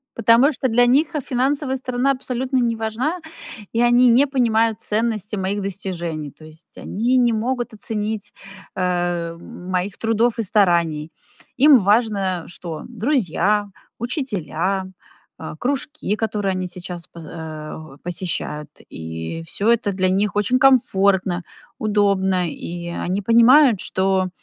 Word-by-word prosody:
потому 230 +5 +5
что 260 -2 -1
для 245 +2 +4
них, 295 +7 +3
э, - - +1
финансовая 265 +2 0
сторона 255 +1 0
абсолютно 260 0 -2
не 235 -2 +1
важна, 225 +10 -2 0.5
и 230 - +1
они 240 +1 +5
не 250 +4 +5
понимают 230 -5 +1
ценности 215 -1 -1
моих 195 +1 -2
достижений. 175 -6 -5
То 155 - -16
есть 155 +2 -16
они 235 +6 -1
не 240 -2 +4
могут 240 +1 -2
оценить, 210 -1 -4 0.4
э, - - -3
м, 175 +2 -3
моих 185 +1 -2
трудов 225 +1 +1
и - - +1
стараний. 170 -6 +1 0.5
Им 285 +1 +7
важно 200 -4 +1
что? 170 -2 -7
Друзья, 210 - 0 0.3
учителя, 195 - -2 0.5
а, 160 - -7
кружки, 275 - -2
которые 210 -3 -1
они 185 0 -3
сейчас 175 -1 -8
по, 170 - -13
а, 155 -1 -7 0.2
о - - -16
посещают, 170 -4 -4 0.2
и 80 - -6
всё 195 +5 -3
это 235 -3 +1
для 185 0 +1
них 200 +2 0
очень 210 +5 +2
комфортно, 195 -9 +3 0.3
удобно. 200 -3 +1
И 170 +2 -7 0.2
они 190 +3 0
понимают, 235 +2 +6
что 190 0 0
205 Hz, 135 wpm, -21 LUFS, 180-240 Hz, 0.5 s, Им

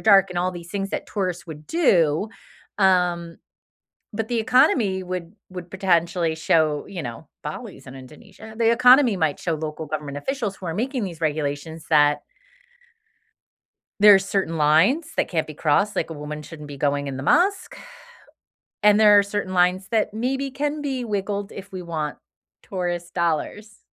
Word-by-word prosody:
dark 195 -3 +5
and 175 - -3
all 180 +1 0
these 170 -1 -10
things 195 0 -3
that - - -4
tourists 180 -4 -3
would 150 -1 -10
do, 190 - +2 0.5
um, 175 -3 +2 0.7
but 220 +1 -3
the 240 - -1
economy 230 -6 +3
would 180 +1 -6 0.2
would 180 -1 -8
potentially 170 -3 +1
show, 155 -2 +1
you 180 -3 -6
know 115 -1 -8
Bali's - - -8
in 130 - -10
Indonesia. 200 - -13
The 230 -1 +3
economy 250 -2 +6
might 155 -3 0
show 165 -2 -1
local 155 0 -5
government 145 -1 -5
officials 230 - -3
who 185 - -12
are 165 - -3
making 250 +1 -2
these 170 -3 -7
regulations 155 +1 -3
that 150 -1 +4 1.8
there 210 0 +9
are - - +4
certain 195 -4 -2
lines 185 - +3
that - - +1
can't 160 -3 -1
be 155 - -8
crossed, 195 +8 +1
like, 180 - -1
a - - -5
woman 150 0 -7
shouldn't 150 -1 -10
be 145 -1 -9
going 145 0 0
in 135 -1 -5
the 135 - -5
mosque, 370 - +2 1.0
and 210 +1 +5
there 210 -1 +7
are 200 - +6
certain 200 -2 -4
lines 180 +1 +2
that 215 -2 0
maybe 265 +4 -2
can 295 +2 -2
be 265 -3 -3
wiggled 205 -1 -3
if 195 0 -10
we 185 -1 -6
want 160 -3 -4 0.4
tourist 175 -2 -4
dollars. 175 +5 -2
185 Hz, 170 wpm, -23 LUFS, 160-210 Hz, 1.8 s, there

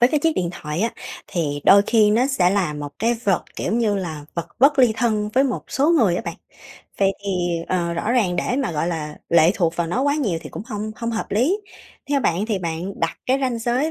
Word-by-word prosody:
với 245 - +6
cái 300 0 +1
chiếc 325 0 +2
điện 175 -2 0
thoại 150 0 -5
á 230 - +1 0.4
thì 145 -5 -2
đôi 200 0 +7
khi 215 -3 +4
nó 235 +5 +3
sẽ 190 -10 +2
là 185 -6 0
một 145 0 -5
cái 230 +3 +2
vật, 195 -3 +1
kiểu - - -2
như 220 -3 +1
là, 160 -6 -5
vật 170 - -3
bất 275 +3 +5
ly 250 -4 +5
thân 215 -4 0
với 265 +3 +4
một 260 - -2
số 285 +5 +2
người 225 - +3
á - - -3
bạn. - - -4 0.6
Vậy 195 -1 +3
thì, 200 - -2 0.4
ờ, 170 -2 0
rõ 190 +7 -1
ràng 200 -8 +2
để 245 +8 -1
mà 265 -9 -1
gọi 155 +1 -1
là 150 -3 -4
lệ 170 0 +5
thuộc 170 -3 0
vào 170 - 0
nó 220 +10 -1
quá 285 +1 +2
nhiều 210 - 0
thì 150 - -9
cũng - - -6
hông 215 -2 -4
hông 230 0 -3
hợp 225 - -3
lý, 275 - +2 0.5
theo 280 - +2
bạn 195 -2 0
thì 215 -4 -1
bạn 170 +2 -4
đặt 165 0 -1
cái 260 +2 +2
ranh 255 -3 -1
giới 245 +7 0
210 Hz, 245 wpm, -22 LUFS, 170-245 Hz, 0.6 s, đôi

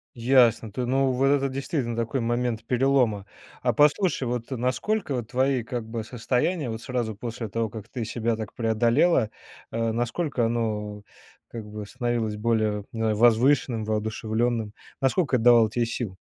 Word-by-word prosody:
Ясно, 120 -3 +3
ты 125 +3 -3
ну, 135 +1 +2
вот 130 +2 +2
это 140 0 +3
действительно 130 -3 -2
такой 115 +2 -1
момент 120 -1 -1
перелома. 125 -5 +2 0.4
А - - +2
послушай, 150 +2 +3
вот 120 0 -3
насколько 135 - -1
вот 120 -4 -3
твои, 130 0 +1
как 120 -1 -4
бы, 115 -1 -4
состояния 125 +6 -1
вот 110 - -6
сразу 120 -4 -3
после 115 0 -5
того, 115 +2 -1
как 110 0 -9
ты 120 - -4
себя 115 +1 -1
так 110 -1 -6
преодолела, 115 +4 +2 0.4
а 115 0 0
насколько 120 +2 -1
оно, 105 -3 -2 0.5
как 115 -2 -7
бы, 105 0 -7
становилось 115 -1 -2
более 110 -2 0
возвышенным, 115 +2 +3
воодушевленным? 110 +1 -1 0.3
Насколько 135 +1 +2
это 110 - 0
давало 115 -2 +7
тебе 120 +2 0
сил? 115 -5 -4
120 Hz, 150 wpm, -25 LUFS, 110-130 Hz, 0.5 s, давало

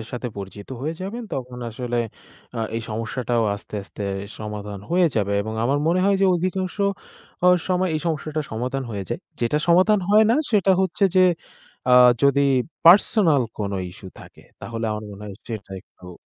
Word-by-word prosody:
এর 110 - -8
সাথে 125 0 -4
পরিচিত 100 +1 -8
হয়ে 155 +4 -3
যাবেন। 205 +6 -5
তখন 125 -1 -6
আসলে 120 +1 -3 0.6
আ - - -3 0.2
এই 115 - -3
সমস্যাটাও 115 +2 -1
আস্তে, 100 - -11
আস্তে, 100 +1 -9 0.4
সমাধান 105 -1 -6
হয়ে 175 0 +4
যাবে 100 -2 +1
এবং 110 +1 -5
আমার 140 +4 +2
মনে 175 +3 +2
হয় 200 0 +3
যে 195 - +5
অধিকাংশ 185 +1 -2 0.9
সময় 185 0 +1
অ - - -2
এই 155 - -1
সমস্যাটা 155 -1 -2
সমাধান 125 +4 -3
হয়ে 100 -2 -4
যায়। - - -3 0.2
যেটা 120 +5 +1
সমাধান 185 +5 +5
হয় 215 +2 +6
না 235 - +4 0.2
সেটা 200 -4 +3
হচ্ছে 190 +1 +1
যে - - +7 0.7
আ - - +5 0.3
যদি 140 0 +4 0.4
পার্সোনাল 170 - +6 0.2
কোনো 100 -2 -2
ইস্যু 95 +1 -11
থাকে - - -15 0.2
তাহলে 115 -1 -5
আমার 105 0 -5
মনে 100 0 -10
হয় 100 - -8
সেটা 110 -4 -7
একটু 90 0 -14
125 Hz, 175 wpm, -23 LUFS, 105-180 Hz, 0.9 s, যে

